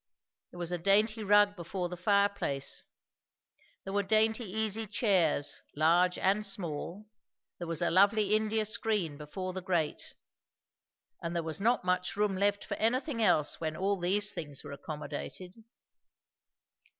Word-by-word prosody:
There - - -14
was 175 -1 -4
a 175 - -2
dainty 215 +5 +3
rug 205 0 +4
before 180 0 -4
the 180 - -6
fireplace; 200 -7 0 1.0
there 195 - -6
were 205 - +2
dainty 220 +3 +2
easy 220 +2 -1
chairs 185 - +1
large 175 +4 +3
and 200 +3 +1
small; 195 0 -3 0.5
there 175 - -5
was 165 0 -2
a 170 - +1
lovely 200 +3 +4
India 215 0 +1
screen 210 -7 0
before 185 +6 -6
the 185 - -4
grate; 175 -4 -2 1.1
and 170 +1 -4
there 170 - -1
was 160 +3 -5
not 235 -2 +2
much 180 0 0
room 205 -2 +1
left 200 +1 +1
for - - -4
anything 250 +3 0
else 170 -9 +2
when 155 -1 -3
all 195 +1 0
these 205 +4 +2
things 145 -4 -6
were - - -9
accommodated. 155 +5 -7
190 Hz, 145 wpm, -31 LUFS, 170-210 Hz, 1.1 s, rug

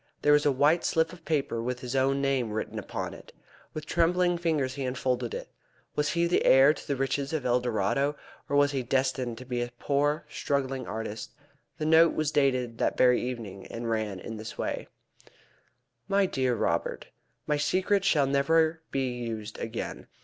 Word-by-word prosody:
There 150 - +6
was 150 0 +4
a - - +5
white 145 +5 +3
slip 160 +1 +1
of 170 -3 -14
paper 140 -7 0
with 125 +1 -3
his 125 0 -4
own 135 +1 +2
name 135 -4 +1
written 110 - -3
upon - - -5
it. - - -13 0.4
With 155 -1 -5
trembling 175 +1 +2
fingers 155 -6 0
he 140 - -4
unfolded 125 -1 -1
it. - - -6 0.5
Was 150 0 +1
he 170 0 +2
the 170 - +2
heir 135 +3 +7
to - - -11
the 140 - 0
riches 135 +2 -1
of 155 -4 -2
El 125 0 +3
Dorado, 125 +5 0 0.3
or 145 - 0
was 145 0 +4
he 135 -2 -1
destined 130 -1 0
to 130 - -9
be 125 -1 -2
a 120 - -2
poor 145 +3 0
struggling 135 -3 -2
artist? 110 0 -5 0.4
The 155 - -3
note 160 +1 +5
was 155 -1 0
dated 130 -5 +1
that - - 0
very 125 -1 +5
evening, 110 -6 -6
and 115 0 -4
ran 110 -4 -2
in 110 +4 -7
this 110 +1 -8
way: - - -3 1.2
"MY 200 0 +3
DEAR 130 -8 0
ROBERT, - - -1 0.4
My 150 - +1
secret 185 +6 +1
shall 155 -7 +3
never 160 +4 +2
be 135 -1 -1
used 115 -3 -5
again. 115 0 -5
135 Hz, 185 wpm, -28 LUFS, 120-150 Hz, 1.2 s, heir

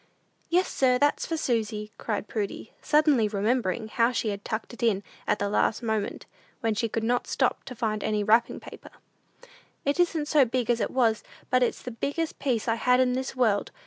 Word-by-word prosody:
"Yes 360 +2 +3
sir; 255 -2 +2
that's 290 +2 +1
for 325 - -2
Susy," 215 -6 -1
cried 210 -2 -3
Prudy, 210 0 -4
suddenly 295 -7 +3
remembering 215 +1 0
how 230 +2 +2
she 230 -3 -1
had 200 -1 -4
tucked 220 +2 -4
it 240 - -11
in 210 -4 +2 0.2
at - - +2
the 205 - -1
last 215 +3 +1
moment, 220 -2 -2 0.4
when 225 -1 +1
she 225 +2 -1
could 225 +1 -2
not 245 +2 0
stop - - 0
to 250 - -8
find 215 -2 -2
any 210 -1 0
wrapping 225 +3 +3
paper. - - -12 1.0
"It 285 +4 0
isn't 330 -4 +2
so 295 -2 +5
big 245 -1 0
as 235 - +1
it 205 - 0
was, 230 -4 +2 0.3
but 255 - +4
it's 245 - 0
the 250 - -5
biggest 290 +7 -3
piece 245 -6 -1
I 225 0 +1
had 250 0 +4
in 255 -1 +3
this 260 +1 -3
world. 220 -5 +2
230 Hz, 200 wpm, -27 LUFS, 215-255 Hz, 1.0 s, so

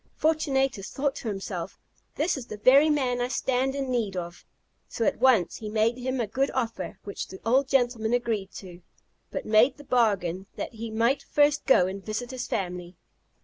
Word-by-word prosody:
Fortunatus 270 -9 0
thought 280 0 -1
to - - -6
himself, 195 -3 -5 0.4
"This 330 +4 +1
is 255 -4 -7
the 215 - -7
very 275 +8 +6
man 255 -5 +1
I 245 - +1
stand 260 +1 0
in 270 -2 -2
need 215 -6 -1
of;" 175 -1 -6 0.5
so 230 - -2
at - - +1
once 240 -8 +3
he 215 - -6
made 220 +2 +2
him 255 +1 -2
a 235 - +1
good 270 +6 0
offer, 235 -3 -3
which 200 - -5
the 190 - -10
old 260 +4 +3
gentleman 240 -4 +1
agreed 225 -5 -1
to, 180 -2 -10 0.5
but - - -5
made 225 +6 +4
the 290 - -12
bargain 195 -8 +1
that - - -5
he 225 0 -6
might 230 +5 +1
first 290 0 +2
go 225 -9 +6
and 190 +1 -5
visit 220 +4 -4
his 255 -1 -5
family. 180 -1 -4
235 Hz, 190 wpm, -27 LUFS, 200-265 Hz, 0.5 s, very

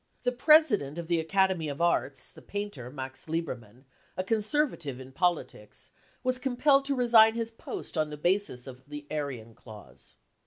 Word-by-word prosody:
The 250 - +2
president 245 - +4
of 170 - -4
the 170 -1 +1
Academy 185 -1 +1
of 140 - -6
Arts, 170 -5 0
the - - -15
painter 205 -12 -5
Max 130 +1 -6
Liehermann, 130 -7 -5 0.3
a 185 - 0
conservative 210 - 0
in 130 0 -10
politics, 150 - -2 0.3
was 255 0 0
compiled 275 +2 +3
to 280 0 0
resign 230 -3 +6
his 230 -1 -3
post 225 - -7
on 155 -1 0
the 150 - -7
basis 175 -6 0
of 130 -1 -11
the 145 0 -7
Aryan 135 -7 -4
clause. 110 -2 -14
170 Hz, 160 wpm, -29 LUFS, 135-225 Hz, 0.3 s, resign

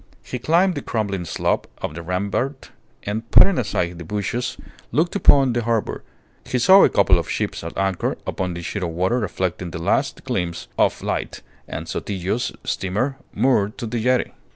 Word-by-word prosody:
He 125 - -5
climbed 175 +8 +3
the - - -4
crumbling 100 -5 -2
slope - - -1
of - - -4
the 85 - -6
rampart, 100 - -2 0.3
and, 110 +3 -4
putting 195 -8 +6
aside 90 -7 -1
the - - -6
bushes, 105 +7 -2 0.3
looked 170 +5 +1
upon 135 -9 +5
the 120 - 0
harbour. 115 -1 -1 0.4
He 125 - -2
saw 190 +11 +7
a - - +6
couple 95 -3 +4
of 85 - -5
ships - - -2
at - - -7
anchor 95 -2 0
upon 90 -2 -2
the 85 - -6
sheet 100 - -3
of 90 - -1
water 95 +9 0
reflecting 90 -4 -2
the 85 - -6
last 85 - 0
gleams 85 -2 -3
of - - +1
light, - - -3 0.2
and - - -6
Sotillo's 100 +4 -2
steamer 110 +9 -1
moored 110 -5 +1
to 120 - -4
the 115 +1 -2
jetty. 125 +2 +2
105 Hz, 175 wpm, -22 LUFS, 90-125 Hz, 0.4 s, saw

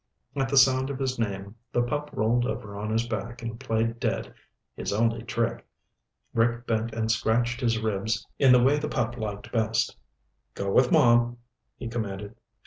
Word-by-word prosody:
At 135 -1 0
the 140 - +1
sound 130 0 +5
of 140 - -3
his 130 -2 -2
name 100 -1 -3
the 120 - +2
pup 150 +4 -2
rolled 120 +3 +1
over 110 -2 -5
on 105 +1 -4
his 115 +2 0
back 115 +2 -5
and 115 0 -5
played 115 +1 -1
dead, - - -2 0.4
his - - -3
only 115 +2 +1
trick. 115 0 -2 0.7
Rick 120 +1 +1
bent 115 0 0
and 110 0 0
scratched 120 +3 +1
his 115 -2 +2
ribs 110 -1 -1
in 135 -2 +6
the 125 -1 +6
way 140 +3 +4
the 150 - -3
pup 120 0 -1
liked 105 -3 -5
best. 110 -1 +1 0.6
"Go 100 0 -2
with 125 +4 +4
Mom," 120 0 +4 0.4
he - - -5
commanded. 105 -3 -4
115 Hz, 175 wpm, -27 LUFS, 110-120 Hz, 0.7 s, in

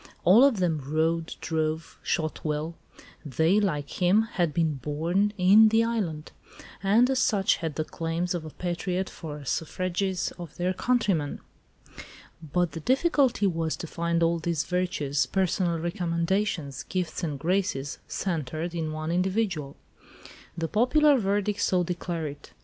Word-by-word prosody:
All 205 +8 +7
of 275 -5 +4
them 170 -5 0
rode, 160 +3 0
drove, 160 0 -2
shot 155 -1 -2
well; 155 +2 -2 0.5
they, 160 - +2
like 150 -6 -2
him, 190 +5 +5
had 180 -8 -1
been 160 -2 0
born 165 +10 0
"in 200 +4 +7
the 225 +1 +3
island," 190 -10 -2 0.5
and 210 +6 +4
as 265 -1 +1
such 200 -6 +2
had 160 -3 -4
the 155 - -1
claims 165 +3 -2
of 175 -3 -3
a 155 - -7
patriot 180 +3 -3
for 155 -3 -7
the 145 - -11
suffrages 185 +5 -2
of 170 -4 -9
their 180 +1 0
countrymen. 195 -10 0 1.0
But 170 +2 0
the 165 - -6
difficulty 265 - +2
was 165 -4 0
to - - -7
find 170 +1 -1
all 165 0 +2
these 165 -2 -1
virtues, 175 -6 0
personal 185 -2 0
recommendations, 170 -3 -1
gifts 180 -2 -3
and 150 -4 -2
graces, 160 -4 -1
centred 165 -1 -3
in 160 -2 -2
one 155 +1 -3
individual. 180 -5 -1 0.8
The 165 -1 -1
popular 280 - +4
verdict 205 0 0
so 180 -1 +2
declared 170 -3 -3
it. - - -18
170 Hz, 145 wpm, -27 LUFS, 160-195 Hz, 1.0 s, All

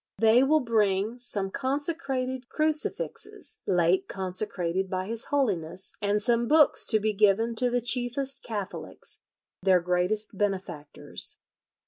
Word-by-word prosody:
They 225 +2 +5
will 305 +3 +3
bring 215 -1 0
some 200 -5 0
consecrated 265 - -2
crucifixes, 315 +8 -2
late 180 0 +2
consecrated 185 -1 -2
by 185 0 -2
his 225 +2 -2
Holiness, 195 - -1
and 205 +1 +1
some 235 +2 +1
books 305 +2 +5
to 220 - +4
be 215 +1 0
given 210 +3 +3
to 250 +1 +2
the 245 0 0
chiefest 255 +3 -1
Catholics, 205 -4 -6 0.4
their 185 -1 +4
greatest 180 +5 -1
benefactors." 190 -7 -3
220 Hz, 120 wpm, -27 LUFS, 190-255 Hz, 0.4 s, They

